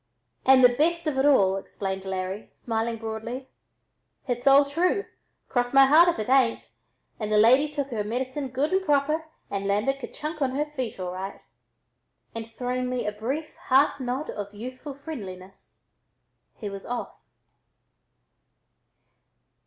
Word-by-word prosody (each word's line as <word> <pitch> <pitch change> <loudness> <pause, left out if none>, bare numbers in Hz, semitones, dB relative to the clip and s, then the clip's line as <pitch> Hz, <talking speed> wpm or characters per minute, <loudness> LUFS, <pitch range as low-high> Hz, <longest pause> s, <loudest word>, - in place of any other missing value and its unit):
"And 260 -1 +7
the 245 -1 +7
best 335 +4 +1
of 290 -4 0
it 275 - +4
all," 195 -9 +4
explained 195 0 -5
Larry, 190 +2 -4
smiling 230 0 -2
broadly; 225 +4 -6 0.8
"h'it's 245 +1 -2
all 275 +1 +7
true, 350 +8 0 0.4
cross 245 0 -1
my 275 0 +9
heart 315 +6 +7
if 345 - -1
it 215 - -2
tain't, 255 -2 +2 0.5
and 215 -1 -3
the 210 - +4
lady 255 +7 +6
took 285 -2 -3
her 220 -5 -2
medicine 260 +6 -3
good 270 +7 -1
and 380 0 +2
proper 305 0 +1 0.3
and 200 0 -2
landed 215 +8 +1
kerchunk 305 +3 -6
on 260 -1 0
her 295 +2 +1
feet 260 -9 -5
all 180 -1 -3
right." 190 +2 -6 0.9
And 225 0 -6
throwing 250 +2 -3
me 250 -1 -2
a 210 - 0
brief 265 +9 -4
half 270 +2 +4
nod 260 +4 -3
of 205 0 -7
youthful 255 +5 -7
friendliness 195 - -10 0.7
he 210 - -6
was 195 -1 -7
off. 245 0 -4
255 Hz, 150 wpm, -26 LUFS, 215-280 Hz, 0.9 s, my